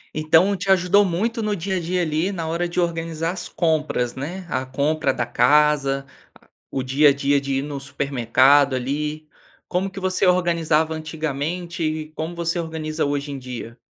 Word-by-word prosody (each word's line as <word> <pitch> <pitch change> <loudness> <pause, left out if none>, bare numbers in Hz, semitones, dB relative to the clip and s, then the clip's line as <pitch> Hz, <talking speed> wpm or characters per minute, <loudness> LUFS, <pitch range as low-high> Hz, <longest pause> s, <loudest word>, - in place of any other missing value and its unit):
Então 160 +6 +4
te 195 +1 -5
ajudou 190 +2 +4
muito 220 +6 -1
no 210 -1 0
dia 190 +2 -2
a - - 0
dia 175 +1 -1
ali, 160 +5 0
na 170 -4 -4
hora 170 +2 -1
de 175 - -2
organizar 165 -1 -1
as 180 -1 -6
compras, 155 -7 0
né. 175 +8 -6
A 130 - -2
compra 140 +4 0
da 120 -2 -2
casa, 135 +2 +3 0.7
o 135 - -2
dia 140 +3 +4
a - - +4
dia 140 0 +1
de 135 -1 -2
ir 135 - 0
no 145 -1 -5
supermercado, 135 0 +3
ali. 150 +4 -3 0.4
Como 185 +2 -1
que 195 0 -8
você 185 0 +1
organizava 165 -3 +2
antigamente 160 +2 -4
e 155 0 -2
como 160 +2 -5
você 170 +1 -1
organiza 160 -2 -3
hoje 145 0 -2
em 140 - -5
dia? 125 -2 -7
155 Hz, 175 wpm, -22 LUFS, 140-175 Hz, 0.7 s, Então